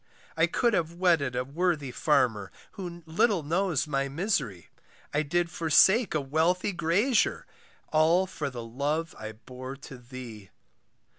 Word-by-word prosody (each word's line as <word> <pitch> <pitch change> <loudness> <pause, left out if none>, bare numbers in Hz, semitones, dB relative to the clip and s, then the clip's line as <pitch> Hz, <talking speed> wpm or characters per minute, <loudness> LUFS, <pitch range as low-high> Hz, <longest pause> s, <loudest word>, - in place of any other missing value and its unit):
I - - +3
could 240 -2 +1
have 170 -3 0
wedded 165 -8 +2
a 125 +1 -1
worthy 150 -1 -1
farmer, 120 -9 +1 0.2
Who 175 -3 -8
little 170 +2 +1
knows 170 +1 0
my 140 -2 -1
misery; 135 - -2 0.4
I 145 - +2
did 170 +3 0
forsake 185 - +4
a 155 - +1
wealthy 165 +8 +1
grazier, 195 +8 +1 0.5
All 160 +4 +4
for 165 -6 -4
the 120 -3 -7
love 145 +8 -2
I 110 0 -6
bore 130 +4 -9
to 135 -2 -11
thee. 120 -5 -10
155 Hz, 140 wpm, -28 LUFS, 130-175 Hz, 0.5 s, forsake